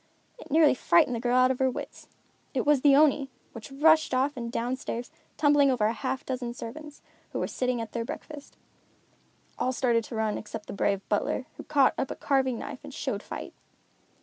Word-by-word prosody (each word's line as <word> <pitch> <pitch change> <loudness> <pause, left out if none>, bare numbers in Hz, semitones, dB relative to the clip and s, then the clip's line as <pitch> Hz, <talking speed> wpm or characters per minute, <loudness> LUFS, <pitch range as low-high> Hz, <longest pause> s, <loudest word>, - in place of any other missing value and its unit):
It 480 - -12
nearly 305 0 +5
frightened 245 -1 +3
the - - -3
girl 245 +1 +1
out 255 0 +5
of 260 - -3
her 260 0 +3
wits. 250 - -7 0.5
It 255 - 0
was 290 -2 +4
the 280 -1 +6
Oni, 285 -2 +4 0.2
which 230 +3 -10
rushed 310 0 +4
off 270 +3 +1
and 235 -2 -5
down 245 +2 -1
stairs, 245 -2 -5 0.3
tumbling 290 -2 +4
over 245 -5 +2
a 220 - +2
half 265 +4 -3
dozen 245 -2 -4
servants, 295 +6 -9 0.3
who - - -2
were - - 0
sitting 250 -1 -1
at 225 -1 -5
their 235 - -2
breakfast. 290 +4 -9 1.0
All 255 - +1
started 235 -2 +1
to 235 - -8
run 220 -1 -1
except 210 0 -8
the - - -7
brave 200 -1 -1
butler, 215 +4 -1
who - - -9
caught 280 -3 +3
up 265 - -1
a - - -4
carving 265 -3 +1
knife - - -7
and - - -9
showed - - -3
fight. - - -7
255 Hz, 200 wpm, -27 LUFS, 235-285 Hz, 1.0 s, the